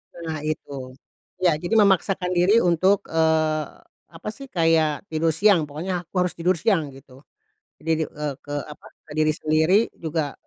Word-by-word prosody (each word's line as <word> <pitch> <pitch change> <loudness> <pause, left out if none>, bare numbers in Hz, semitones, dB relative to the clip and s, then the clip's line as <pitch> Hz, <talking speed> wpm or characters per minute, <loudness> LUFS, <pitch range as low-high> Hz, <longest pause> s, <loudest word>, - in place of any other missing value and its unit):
Nah 160 -2 -5
itu, 135 -4 -5 0.5
ya 175 - +5
jadi 175 +6 -2
memaksakan 195 -3 +3
diri 195 +6 +5
untuk, 185 +3 +3
eee, 160 -1 +2 0.4
apa 165 +5 -8
sih 275 +4 -11
kayak 165 - +1
tidur 160 0 +1
siang 180 -5 +4
pokoknya 175 +5 -3
aku - - -56
harus 180 - -2
tidur 180 +2 +2
siang 165 -3 +1
gitu, 130 -1 -16 0.6
diri 160 0 0
eee, 150 -1 -4
ke 145 - -8
apa? 150 - -12 0.2
ke 155 - -16
diri 155 0 +3
sendiri 155 +4 +3 0.2
juga, 155 -3 -3
160 Hz, 155 wpm, -23 LUFS, 155-180 Hz, 0.6 s, ya